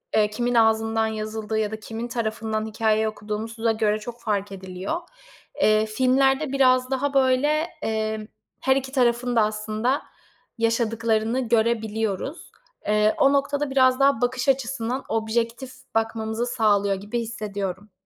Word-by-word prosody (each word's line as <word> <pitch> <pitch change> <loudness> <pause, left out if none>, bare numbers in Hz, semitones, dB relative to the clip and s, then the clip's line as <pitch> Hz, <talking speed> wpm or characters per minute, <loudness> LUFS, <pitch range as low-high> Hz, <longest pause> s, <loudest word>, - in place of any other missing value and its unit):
eee, 210 -1 +4
kimin 240 +3 -1
ağzından 225 0 +3
yazıldığı 220 0 -3
ya 215 0 -1
da 220 - -5
kimin 225 +2 -6
tarafından 220 -2 -2
hikâyeyi 220 0 +1
okuduğumuza 220 +2 -2
göre 215 -1 +1
çok 240 +2 -9
fark 205 -2 -1
ediliyor. 190 - -4 0.6
Eee, 215 0 +4
filmlerde 265 +5 +2
biraz 255 -1 +3
daha, 275 +2 0
böyle, 260 0 +3 0.3
emm, 220 -1 -2 0.3
her 265 0 +3
2 265 -1 -2
tarafın 245 -2 +1
da 230 - +5
aslında 215 +5 0 0.6
yaşadıklarını 230 +1 0
görebiliyoruz. 220 - -1 0.4
Eee, 210 +1 +3
o 275 +1 +4
noktada 285 +1 0
biraz 260 -1 +4
daha 275 -4 +3
bakış 245 +2 0
açısından 260 -1 -1
objektif 230 +3 -1 0.2
bakmamızı 225 +1 -1
sağlıyor 210 -5 +2
gibi 205 +5 -4
hissediyorum. 205 -3 -5
225 Hz, 130 wpm, -24 LUFS, 215-255 Hz, 0.6 s, da